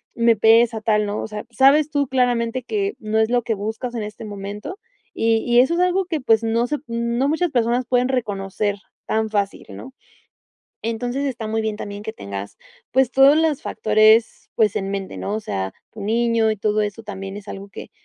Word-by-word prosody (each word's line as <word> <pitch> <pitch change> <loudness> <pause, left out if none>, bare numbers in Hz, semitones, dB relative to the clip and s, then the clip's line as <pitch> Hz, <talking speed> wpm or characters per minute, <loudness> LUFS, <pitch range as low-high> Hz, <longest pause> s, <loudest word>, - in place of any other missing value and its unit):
me 235 -1 +4
pesa 225 +1 +4
tal, 210 -1 +2
¿no? 205 +1 -3
O - - -4
sea, 210 -1 -7
sabes 280 +5 +4
tú 285 -2 +1
claramente 245 -1 0
que 400 - -2
no 215 0 -1
es 220 0 +2
lo 245 0 +1
que 225 - -1
buscas 220 +4 -4
en 235 - -3
este 210 +1 -8
momento, 205 - -7 0.3
y 225 0 +2
y 240 0 +4
eso 265 +7 +4
es - - -1
algo 365 +1 +2
que, 335 -4 -2
pues, 225 -3 +3
no 230 +1 +1
se, 295 - -1
no 235 +3 -1
muchas 320 +2 0
personas 245 0 +1
pueden 250 0 +2
reconocer 205 -4 -2 0.3
tan 220 0 0
fácil, 200 -2 -2
¿no? 260 - -10 0.9
Entonces 245 +4 -2
está 245 -5 -4
muy 220 +1 -1
bien 215 -1 -2
también 205 -1 -7
que 220 +1 -5
tengas, 100 - -7 0.3
pues 260 -1 +2
todos 270 +3 +6
los 315 -3 +1
factores, 215 +1 +3
pues 215 -3 +3
en 195 0 -2
mente, 195 -1 -4
¿no? 205 - -3
O - - -3
sea, 95 - -3 0.2
tu 220 - -10
niño 230 +1 +1
y 215 - -1
todo 215 +1 0
eso 210 +2 -4
también 195 -1 -7
es 205 -1 -10
algo 195 +1 -7
que, - - -10
225 Hz, 205 wpm, -21 LUFS, 210-250 Hz, 0.9 s, todos